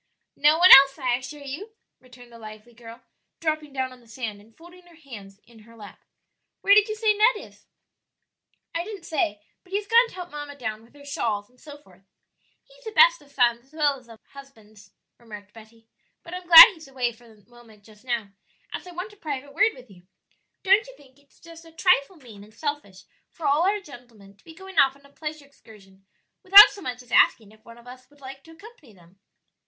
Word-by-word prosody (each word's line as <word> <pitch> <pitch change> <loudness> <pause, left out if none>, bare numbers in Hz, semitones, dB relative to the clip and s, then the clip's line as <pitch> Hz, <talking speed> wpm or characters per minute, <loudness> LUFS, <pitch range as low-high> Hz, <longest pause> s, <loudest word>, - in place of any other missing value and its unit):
"No 300 +2 +3
one 360 +2 +5
else, 270 +1 +8
I 255 -4 -2
assure 285 +3 -11
you," 365 +12 -9 0.2
returned 245 -1 -18
the 230 - -15
lively 215 +2 -13
girl, 230 0 -15 0.4
dropping 310 -2 -4
down 260 -1 -5
on 255 - -18
the 235 - -24
sand 220 -3 -8
and 220 +2 -25
folding 350 +2 -17
her 345 - -20
hands 210 -11 -14
in 235 -1 -20
her 230 +2 -19
lap. 210 -2 -15 0.6
"Where 400 - +4
did 420 +1 +4
you 430 - -4
say 435 -1 +1
Ned 435 +4 +2
is?" - - -23 1.1
"I 335 - -3
didn't 415 +1 -11
say; 210 -9 -3 0.2
but 365 - -25
he 390 - -2
has 415 - -6
gone 465 +3 +3
to - - -16
help 360 -1 -10
mamma 290 -1 -9
down 220 -5 -7
with 230 +5 -24
her 285 0 -17
shawls 215 -6 -4
and 250 - -29
so 295 -1 -13
forth." 190 -11 -24 0.6
"He's - - -23
the 440 - -8
best - - +4
of 285 - -22
sons 240 -3 0
as 270 - -31
well 295 -3 -1
as 245 -2 -25
of 225 -1 -15
husbands," 220 -8 -18 0.3
remarked 210 -3 -14
Betty; 225 0 -19 0.4
"but 335 - -12
I'm 360 -1 -9
glad 335 -2 +12
he's 320 -5 -16
away 255 -3 -3
for 240 +1 -21
a 215 -3 -22
moment 235 -4 -20
just 215 +1 -21
now, 235 -5 -4 0.4
as - - -8
I - - -11
want 365 +5 -8
a - - -21
private 285 -4 -7
word 415 +8 +1
with 250 -4 -17
you. 180 -1 -20 0.6
Don't 400 +4 +2
you - - -16
think 270 -1 -23
it 285 0 -32
is - - -29
just 335 0 -15
a 330 - -18
trifle 360 -1 0
mean 230 -10 -16
and 215 +1 -20
selfish 290 -9 -7 0.3
for 325 - -11
all 295 +5 +1
our 415 +1 -2
gentlemen 240 - -17
to 200 - -30
be 325 - -16
going 380 0 -5
off 270 -1 +3
on 280 0 -24
a 280 - -21
pleasure 300 -1 -9
excursion 195 -8 -21 0.3
without 400 +2 +9
so 400 - -13
much 250 -4 -7
as 240 - -23
asking 215 -3 +2
if 220 0 -23
one 230 0 -16
of 235 - -19
us 255 +1 -15
would 290 0 -26
like 270 0 -12
to 325 - -16
accompany 325 - -18
them?" 180 +1 -24
270 Hz, 225 wpm, -23 LUFS, 225-330 Hz, 1.1 s, glad